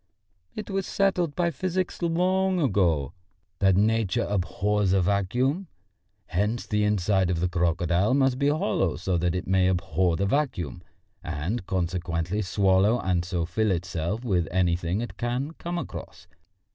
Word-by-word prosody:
It 210 -1 -6
was 195 -1 -1
settled 180 -6 +1
by 170 -1 +1
physics 185 +5 -2
long 185 +2 +1
ago 90 - +1 0.5
that 95 -2 +4
Nature 110 -2 +2
abhors 100 0 0
a 95 - +3
vacuum. 125 - 0 0.6
Hence 105 +8 -1
the 105 -1 0
inside 100 -2 +2
of 90 -2 0
the 90 - +1
crocodile 90 +5 +1
must 135 -2 +2
be 140 - +2
hollow 150 - 0
so 90 +1 -2
that 90 +1 0
it 90 - -3
may 95 0 +3
abhor 90 -1 +1
the 100 - 0
vacuum, 100 - -1 0.4
and 90 +8 -3
consequently 90 +1 -1
swallow 95 +3 +3
and 90 -2 0
so 85 -1 -2
fill 110 +5 0
itself 90 +5 -2
with 90 -7 +1
anything 90 +1 0
it 120 - -6
can 125 +5 -2
come 175 +1 -3
across. - - -7
100 Hz, 145 wpm, -26 LUFS, 90-130 Hz, 0.6 s, that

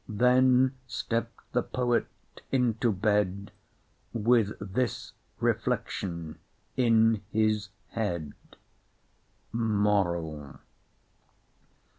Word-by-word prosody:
Then 125 +3 +4
stepp'd 115 0 -3
the 125 - +2
poet 120 -1 0 0.4
into 120 -3 +2
bed 100 -1 0 0.6
With 115 -2 +2
this 105 +5 -2 0.3
reflection 85 -4 -2 0.4
in 115 -3 +4
his 110 -2 +1 0.2
head: 85 -10 -3 1.2
MORAL. 95 -9 0
110 Hz, 65 wpm, -28 LUFS, 100-120 Hz, 1.2 s, Then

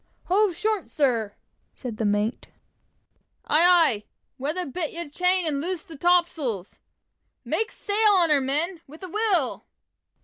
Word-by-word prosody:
"Hove 390 0 +2
short, 430 0 -2
sir!" 235 -8 0 0.4
said 240 -5 -7
the 220 - -1
mate. 205 +3 -1 1.0
"Aye, 310 - +3
aye! 335 -12 +4 0.4
Weather 310 +7 -2
bit 310 +3 -3
your 340 -1 -5
chain 360 +4 +1
and 285 -3 -1
loose 355 0 -3
the 325 - -12
topsails! 305 - 0 0.7
Make 445 +1 -1
sail 420 0 +2
on 345 -4 +3
her, 285 -2 +4
men 315 +6 -1
with 310 +6 -13
a 370 - -6
will!" 390 - 0
330 Hz, 140 wpm, -25 LUFS, 270-365 Hz, 1.0 s, aye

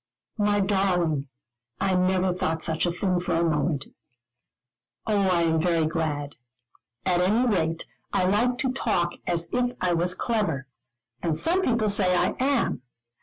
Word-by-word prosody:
"My 205 0 +2
darling, 180 -7 +1 0.5
I 195 -1 +1
never 185 0 +2
thought 160 -2 -1
such 160 +2 0
a - - 0
thing 180 +1 0
for 175 -1 -1
a 165 - +2
moment." 150 -2 0 1.2
"Oh, 200 -3 +1
I 170 -1 +2
am 160 -1 +2
very 165 -2 +2
glad. 155 -3 -3 0.7
At 180 -1 +2
any 215 +7 +2
rate 165 -7 0 0.3
I 185 - +1
like 235 +6 +2
to 265 -1 -1
talk 175 -9 0
as 170 -1 0
if 245 0 0
I 180 -1 +1
was 175 +2 +1
clever. 200 - -1 0.6
And 165 -3 -1
some 355 +3 +3
people 235 - +1
say 185 -3 +3
I - - +1
am. 265 - +1
180 Hz, 155 wpm, -25 LUFS, 165-205 Hz, 1.2 s, some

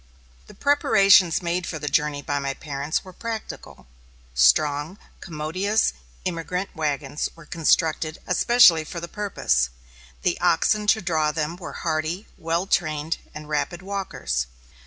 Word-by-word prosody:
The - - -14
preparations 195 - +4
made 175 +1 -1
for 160 - -4
the 150 -1 -5
journey 145 0 0
by 145 +1 -1
my 140 -1 -3
parents 145 +3 -3
were 185 - -11
practical. 225 +2 -7 0.5
Strong, 145 - +3 0.2
commodious 185 +6 -1 0.3
emigrant 180 +2 -3
wagons 150 -2 -2
were 165 -2 -14
constructed 160 0 +1
especially 180 -3 +5
for 170 +3 -6
the 170 - -6
purpose. 120 - 0 0.5
The - - +1
oxen 210 0 +2
to 220 -1 +3
draw 155 -4 +1
them 155 +1 -2
were 180 - -8
hardy, 160 +4 -1
well 165 +3 -1
trained, 155 -4 0 0.2
and 155 -1 -8
rapid 170 +4 -2
walkers. 135 - -3
165 Hz, 135 wpm, -24 LUFS, 150-185 Hz, 0.5 s, especially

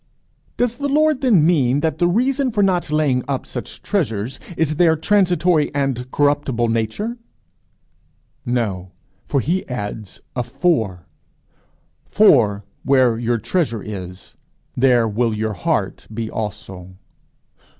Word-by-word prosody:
"Does 240 -1 0
the 285 +1 -2
Lord 305 0 +2
then 215 - +4
mean 145 -5 +2
that 160 -1 -1
the 175 - +3
reason 255 +7 +1
for 210 -2 +1
not 180 -4 +1
laying 145 -5 +1
up 135 -2 -2
such 120 - -7
treasures 125 - -2 0.2
is 155 -2 0
their 165 -2 +4
transitory 175 -2 +2
and 135 -3 -1
corruptible 145 -5 +1
nature?" 115 - -2 1.3
"No. 100 -7 -2 0.5
He 180 - 0
adds 110 -4 -6 0.2
a 125 - 0
For: 120 - -1 1.0
'For 105 - +4 0.2
where 130 -4 +3
your 120 0 0
treasure 115 - -1
is, 90 -3 -8 0.4
there 125 -3 +3
will 110 +1 0
your 110 0 -2
heart 90 - -2
be 110 0 -4
also.'" 95 -4 -6
130 Hz, 120 wpm, -20 LUFS, 110-175 Hz, 1.3 s, then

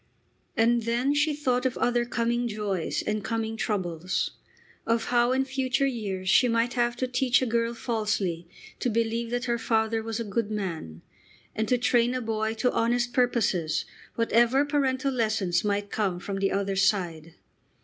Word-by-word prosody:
And 235 +1 +3
then 240 +5 +1
she 295 +1 +2
thought 255 -4 0
of 260 -2 -1
other 240 0 +1
coming 240 0 0
joys 210 -6 -2
and 215 -1 -1
coming 225 0 -2
troubles, 180 -5 -2 0.6
of 230 0 +1
how 240 0 +4
in 265 +1 +1
future 265 0 0
years 205 -8 -3
she 250 +7 +5
might 230 +1 +1
have 240 -1 +1
to 255 - -2
teach 250 0 +2
a 260 - 0
girl 235 0 0
falsely 210 -8 -2 0.3
to 250 - 0
believe 230 +1 -1
that 245 +1 -2
her 235 -1 0
father 225 0 +1
was 225 0 -4
a - - -1
good 215 +1 -2
man, 170 - -5 0.5
and 220 0 -1
to 250 - +3
train 245 0 +2
a 255 - -1
boy 220 -1 -1
to 250 +2 +1
honest 240 +1 +1
purposes 220 - +1 0.3
whatever 235 +4 +3
parental 275 -2 0
lessons 215 -8 0
might 205 0 -1
come 195 -5 -1
from 195 +2 -4
the 195 0 +1
other 195 0 -1
side. 170 -5 0
230 Hz, 170 wpm, -27 LUFS, 205-245 Hz, 0.6 s, she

